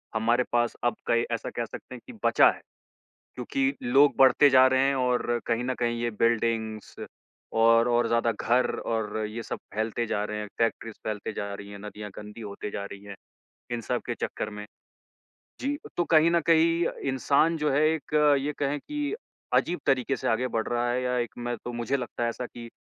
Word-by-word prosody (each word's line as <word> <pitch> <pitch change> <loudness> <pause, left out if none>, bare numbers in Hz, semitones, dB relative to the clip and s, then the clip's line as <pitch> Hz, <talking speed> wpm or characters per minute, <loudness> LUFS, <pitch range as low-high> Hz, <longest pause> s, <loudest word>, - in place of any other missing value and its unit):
हमारे 115 +3 +2
पास 120 0 +1
अब 120 - +2
कई 115 0 +3
ऐसा 115 - -2
कह 120 - -3
सकते 125 - -9
हैं 120 - -11
कि - - -9
बचा - - +6
है। - - -12 0.7
क्योंकि 275 -1 0
लोग 140 +2 +5
बढ़ते 135 +2 +6
जा 130 -1 +7
रहे 130 0 +3
हैं 140 - +1
और 125 -2 +1
कहीं 115 +1 0
न 130 +1 -1
कहीं 120 -1 0
ये 120 - 0
बिल्डिंग्स 115 -2 0 0.6
और 115 +1 +5
और 120 0 +2
ज़्यादा 115 0 +2
घर 120 +3 +1
और 110 -2 -2
ये 115 +2 -6
सब - - -5 0.2
फैलते 110 +2 -1
जा 105 -2 -1
रहे 105 0 -4
हैं, 105 - -5
फैक्ट्रीज़ 115 -1 -1
फैलते 110 0 -4
जा 100 -1 -4
रही 100 0 -8
हैं, 100 - -8
नदियाँ 105 0 -8
गंदी 105 +2 -9
होती 105 -1 -6
जा 100 - -4
रही 100 0 -10
हैं 100 -1 -9 0.6
इन 120 -1 -2
सब - - -2
के - - -2
चक्कर 105 - -4
में। 105 0 -8 1.0
जी, 285 +2 -1 0.2
तो 175 - +2
कहीं 160 0 +5
न 170 0 +3
कहीं 165 +1 +4 0.2
इंसान 140 +5 +2
जो 150 -1 0
है 140 +3 +2
एक 160 -1 -4 0.3
ये 145 +2 -2
कहें 145 +1 0
कि 295 - -3 0.4
अजीब 175 +1 +2
तरीके 135 0 +2
से - - -3
आगे 120 +3 +1
बढ़ 115 -2 -2
रहा 120 0 0
है 125 +1 0
या 125 0 0
एक 120 -3 -1
मैं 120 0 -3
तो 120 - -4
मुझे 120 +3 -1
लगता 125 -2 -5
है 120 - +2
ऐसा 125 +2 -5
कि 120 -1 -10
120 Hz, 205 wpm, -27 LUFS, 115-135 Hz, 1.0 s, जा